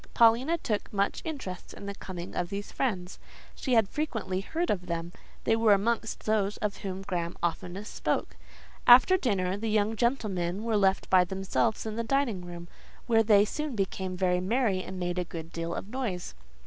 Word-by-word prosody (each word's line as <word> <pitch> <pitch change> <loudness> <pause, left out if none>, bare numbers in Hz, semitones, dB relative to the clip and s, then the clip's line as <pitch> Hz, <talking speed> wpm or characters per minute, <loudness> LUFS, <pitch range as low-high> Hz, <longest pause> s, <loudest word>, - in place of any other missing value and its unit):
Paulina 240 +8 +5
took 215 -9 -2
much 200 -1 0
interest 260 - -6
in - - -9
the 200 - -4
coming 180 -3 -7
of 175 -1 -2
these 200 +1 -5
friends; 190 -9 -2 0.3
she 255 -3 0
had 225 -3 +5
frequently 225 -9 -2
heard 330 - -1
of 180 -3 -2
them; 170 0 -3 0.3
they 225 - +3
were 225 -2 +5
amongst 225 +2 0
those 210 -2 +1
of 205 -1 -2
whom 190 -1 -5
Graham 175 -3 -3
oftenest 180 +4 -3
spoke. - - -1 0.5
After 255 +10 +9
dinner, 195 - 0
the 225 +2 -2
young 215 +1 +2
gentlemen 205 -6 0
were 230 -1 0
left 195 -2 +2
by 185 -1 +7
themselves 195 +5 -1
in 220 0 -4
the 230 - 0
dining 235 -5 0
room, 175 -1 -8 0.4
where 225 -2 +4
they 210 -2 +5
soon 300 +4 -3
became 190 -2 -2
very 180 -1 +2
merry 205 -1 +1
and 185 0 -7
made 175 0 -1
a - - +1
good 165 -1 -8
deal 165 0 -3
of - - -5
noise. 225 -8 -3
200 Hz, 185 wpm, -29 LUFS, 185-230 Hz, 0.5 s, After